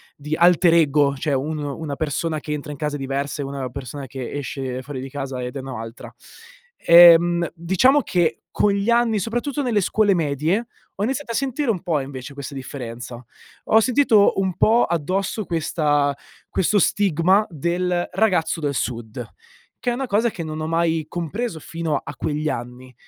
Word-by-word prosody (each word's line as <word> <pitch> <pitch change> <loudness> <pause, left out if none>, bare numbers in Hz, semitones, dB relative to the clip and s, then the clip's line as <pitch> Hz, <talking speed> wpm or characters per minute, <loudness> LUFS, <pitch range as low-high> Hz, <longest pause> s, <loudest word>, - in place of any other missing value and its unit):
di 150 +2 -4
alterego, 165 -5 +4
cioè 145 0 -1
un 150 +4 -1
una 145 0 -4
persona 155 +1 -2
che 150 - -7
entra 150 0 -5
in 145 - -7
casa 150 0 -2
è - - -12
diversa 140 +2 -3
e - - -3
una 135 -1 -4
persona 135 +1 -7
che 130 -1 -6
esce 130 -2 -4
fuori 135 -2 -6
di 135 - -7
casa 135 -2 -5
ed 125 +3 -5
è - - -3
o - - -7
n'altra. 115 -2 -8 0.7
Ehm, 170 0 +7
diciamo 190 - +3
che, 175 -3 0
con 205 - +2
gli 200 +3 -1
anni, 235 -3 +3
soprattutto 240 +8 -2
nelle 230 -6 +1
scuole 205 +1 +2
medie, 165 - 0 0.3
ho 200 - -3
iniziato 265 +1 -2
a - - -3
sentire 270 0 -1
un 185 -6 0
po' 160 -4 0
invece 135 0 -7
questa 140 0 -7
differenza. 120 -2 -7 0.4
Ho 220 - +5
sentito 235 -4 +4
un 190 -3 -1
po' 230 +2 +4
addosso 185 +5 -1
questa 150 -4 0 0.3
questo 205 +3 +2
stigma 190 +2 +3
del 175 +3 -1
ragazzo 185 -5 +1
del 145 -2 -1
sud, 115 -4 -4 0.6
che 245 - -1
è - - -1
una 265 +1 -3
cosa 220 +2 +1
che 170 - -6
non 155 0 -5
ho 155 - -3
mai 165 -1 0
compreso 175 +3 -4
fino 165 -1 -3
a 145 - -8
quegli 155 +1 -2
anni. 125 +1 -6
160 Hz, 175 wpm, -22 LUFS, 140-195 Hz, 0.7 s, Ehm